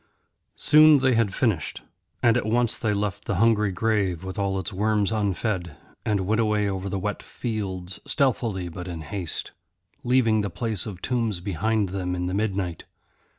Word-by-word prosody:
Soon 155 0 +7
they 130 -1 +3
had 115 -4 +2
finished. 100 - -1 0.4
And 115 -1 +5
at 125 - 0
once 120 +1 +2
they 110 - 0
left 100 -1 -2
the 100 - -1
hungry 105 0 +3
grave 95 -3 0
with 95 +1 -5
all 100 -1 0
its 95 -1 -3
worms 105 +1 +1
unfed, 100 -5 -1 0.3
and 105 -3 0
went 110 +3 +2
away 105 -2 +1
over 95 0 -3
the 95 - -2
wet 105 +2 -3
fields 100 -5 -4
stealthily 115 - 0
but 90 +2 -7
in 85 -2 -5
haste, 85 +2 -5 0.5
leaving 120 -3 +3
the 100 - -2
place 110 0 -2
of 95 -4 -8
tombs 115 -6 0
behind 100 +3 0
them 90 -1 -2
in 90 0 -2
the 90 - -2
midnight. 95 -5 -2
105 Hz, 170 wpm, -25 LUFS, 95-110 Hz, 0.5 s, Soon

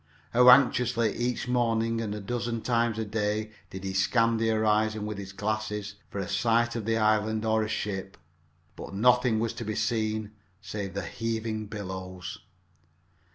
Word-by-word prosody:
How 125 +1 +7
anxiously 125 -3 +5
each 120 +1 -1
morning 115 -2 +1
and 105 -2 -3
a - - -5
dozen 115 +2 -3
times 115 -2 +1
a 110 - -1
day 105 0 -1 0.2
did 95 0 -8
he 95 0 -3
scan 115 +4 +2
the 115 0 +1
horizon 110 -1 +1
with 105 -1 -4
his 100 -1 -7
glasses 105 0 -3 0.2
for - - -7
a 95 -2 -2
sight 115 +4 +2
of 115 -3 -3
the 115 0 +1
island 110 0 +2
or 110 0 +2
a 110 - -2
ship! 95 -3 -3 0.6
But - - -8
nothing 125 +1 +4
was 115 0 -1
to 115 - -6
be 110 -1 -3
seen 110 -2 -1 0.3
save 100 -1 -5
the 100 -3 -3
heaving 110 +2 -3
billows. 95 -3 -6
110 Hz, 165 wpm, -28 LUFS, 105-115 Hz, 0.6 s, How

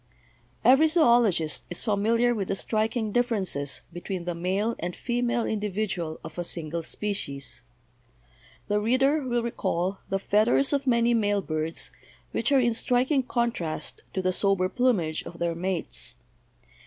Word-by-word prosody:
Every 270 +5 +7
zoologist 235 - +3
is 175 - -4
familiar 230 +3 +2
with 200 -5 -2
the 195 - -1
striking 220 +1 0
differences 195 - -1
between 175 0 -5
the 175 - -1
male 190 +7 -1
and 175 +1 -3
female 240 -1 0
individual 205 -6 -2
of 160 +2 -8
a - - 0
single 170 -1 -4
spe 205 +5 -3
cies. 140 -8 -6 1.1
The 205 0 +2
reader 265 +7 +2
will 240 -3 -1
recall 190 -5 -1
the 195 - +1
feathers 215 +8 +3
of 280 -1 0
many 235 -1 +4
male 205 -3 +1
birds 155 0 -2 0.4
which - - 0
are 275 - +6
in 240 -2 +2
striking 255 +5 +2
contrast 235 -10 -2
to 190 - -1
the 185 0 +2
sober 195 -1 +2
plumage 200 -10 +1
of 170 - -10
their 170 0 0
mates. 180 0 -3
210 Hz, 145 wpm, -27 LUFS, 175-240 Hz, 1.1 s, Every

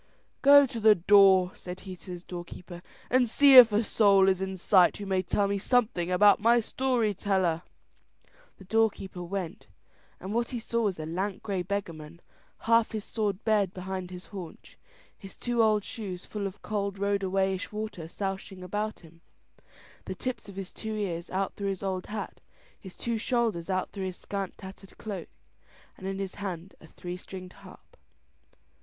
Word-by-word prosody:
"Go 285 0 +8
to 240 -3 -6
the 215 -1 +6
door," 190 0 +5
said 180 +1 -8
he 190 -1 -8
to 185 - -13
his 175 0 -9
doorkeeper, 175 0 -9 0.3
"and 250 -2 +3
see 280 +3 +6
if 245 -3 +11
a 210 +2 +2
soul 200 -3 +4
is 190 -1 +2
in 190 0 -3
sight 180 0 +4
who 205 - -6
may 190 -1 +1
tell 200 +2 0
me 200 0 -1
something 215 -6 +1
about 200 +3 +5
my 235 +2 +5
story 235 -2 0
teller." 185 -4 0 1.0
The - - -13
doorkeeper 195 -3 0
went, 185 +2 -5 0.5
and 190 +2 -6
what 235 +1 0
he 245 - -4
saw 235 +1 -1
was 195 -3 -1
a 155 - -5
lank 185 +5 -3
grey 195 -3 -2
beggarman, 170 -4 -5 0.4
half 230 0 +3
his 215 -2 -4
sword 210 -2 -2
bared 205 -4 +1
behind 185 -1 -5
his 180 0 -9
haunch, 180 -5 -10 0.4
his 195 -1 -12
two 240 -1 0
old 215 -2 +3
shoes 195 -5 -6
full 205 -2 -4
of 195 +1 -11
cold 200 -2 -2
road 200 0 0
a 190 - -2
wayish 190 0 0
water 210 -6 -5
sousing 195 +1 -5
about 210 +4 -3
him, 165 -1 -18 0.8
the - - -5
tips 255 -5 -5
of 195 - -11
his 195 -1 -6
two 220 -1 -5
ears 175 -5 -3
out 190 0 -2
through 200 -1 -3
his 195 -1 -4
old 190 -1 -3
hat, 210 -1 -6 0.4
his 190 -2 -12
two 235 -2 -2
shoulders 225 -8 -1
out 185 -1 -1
through 195 -2 -4
his 185 -1 -5
scant 195 -2 -5
tattered 190 0 -12
cloak, 200 -6 -6 0.7
and 190 - -8
in 195 0 -3
his 195 -1 -4
hand 185 -1 -5
a 160 - -14
three 175 +2 -7
stringed 185 0 -10
harp. - - -16
195 Hz, 180 wpm, -28 LUFS, 185-215 Hz, 1.0 s, if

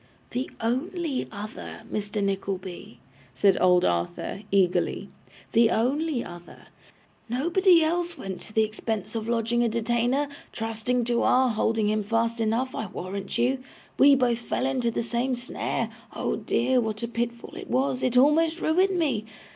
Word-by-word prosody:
'The 255 +3 -2
only 280 +5 -1
other, 210 +1 -8
Mr. 205 0 -2
Nickleby,' 190 -7 -4 0.4
said 195 +8 +4
old 180 -1 +5
Arthur, 85 - -1
eagerly. 180 -2 +1 0.4
'The 230 -1 +5
only 270 +3 0
other. 175 0 -12 0.6
Nobody 340 - +4
else 345 +2 -1
went 190 -1 -6
to - - -10
the 220 - +4
expense 215 -1 -3
of 225 -1 -3
lodging 235 +1 +1
a 235 - +2
detainer, 240 +5 +1 0.2
trusting 225 +2 -1
to 235 0 +1
our 255 0 +4
holding 220 -1 +1
him 215 0 +1
fast 230 +2 0
enough, 230 +4 0
I 220 - -3
warrant 190 +3 -5
you. 255 +3 +2 0.4
We 280 0 +8
both 245 -3 +2
fell 240 - -2
into 260 -3 +1
the 230 - -2
same 240 +3 -1
snare; 245 +1 -3 0.2
oh - - -1
dear, 250 +1 +1
what 220 -1 -3
a - - -1
pitfall 235 0 -4
it - - -8
was; 260 0 +1
it 250 -1 +1
almost 315 +5 +4
ruined 370 +4 +2
me! 265 -11 0
235 Hz, 155 wpm, -26 LUFS, 215-260 Hz, 0.6 s, We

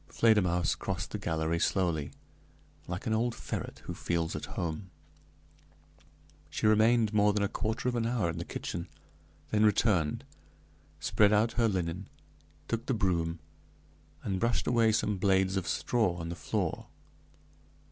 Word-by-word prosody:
Fledermausse 90 -6 +3
crossed 95 -1 -4
the 105 - -3
gallery 80 -2 -1
slowly, 85 -6 +1 0.8
like 90 +4 -5
an 110 - 0
old 115 +2 +1
ferret - - -6
who - - -4
feels 85 -2 -1
at - - -4
home. 85 +2 -3 1.6
She - - -3
remained 110 +1 +4
more 105 0 +4
than 105 0 +1
a - - +2
quarter 110 +4 -2
of 125 - +1
an 115 -1 0
hour 115 -6 0
in 85 0 -3
the - - -3
kitchen, 85 0 -5 0.6
then 105 0 +3
returned, 100 -7 +2 0.8
spread 105 -1 +3
out 110 +2 +3
her 115 0 +2
linen, 90 -1 -2 0.6
took 115 0 -3
the 130 - +1
broom, 85 -5 0 0.8
and 95 -2 -1
brushed 115 +2 +1
away 115 -2 +4
some 105 -1 +1
blades 95 0 +3
of 95 -3 -1
straw 110 -8 +1
on 85 -1 -5
the 85 - -4
floor. - - -2
100 Hz, 145 wpm, -30 LUFS, 85-110 Hz, 1.6 s, remained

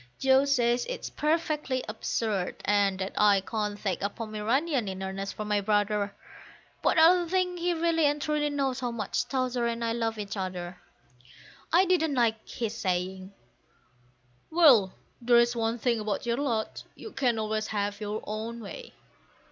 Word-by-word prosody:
Joe 265 +1 +4
says 245 -3 +2
it's - - -5
perfectly 300 -4 -1
absurd, 215 -3 -2
and 200 -1 +2
that 190 +1 -4
I 205 -2 +5
can't 210 +1 -3
take 190 -4 -2
a 200 - 0
Pomeranian 230 +5 -1
in 190 0 -5
earnest 195 +1 -4
for 215 - -5
my 210 -1 +1
brother; 205 0 0 0.7
But - - +2
I 320 - +8
don't 355 -2 +2
think 360 -1 0
he 350 0 0
really 330 -2 +2
and 295 +1 0
truly 295 0 0
knows 275 -3 -1
how 250 -2 -2
much 230 -4 -2
Towser 255 -2 0
and 235 0 -2
I 230 - 0
love 225 -1 -2
each 205 -1 -5
other. 180 -2 -5 0.9
I 360 +3 +5
didn't 320 -5 +1
like 225 -3 0
his 225 -2 -3
saying, 185 -1 -2 1.2
"Well, 270 - +5 0.3
there's 240 0 +4
one 230 0 0
thing 235 -1 0
about 210 0 -3
your 235 0 0
lot, 235 -6 -2
you 440 - -9
can 245 -4 0
always 215 0 -1
have 205 0 -2
your 210 +1 -4
own 220 +2 -5
way." 485 - -9
230 Hz, 165 wpm, -28 LUFS, 205-280 Hz, 1.2 s, I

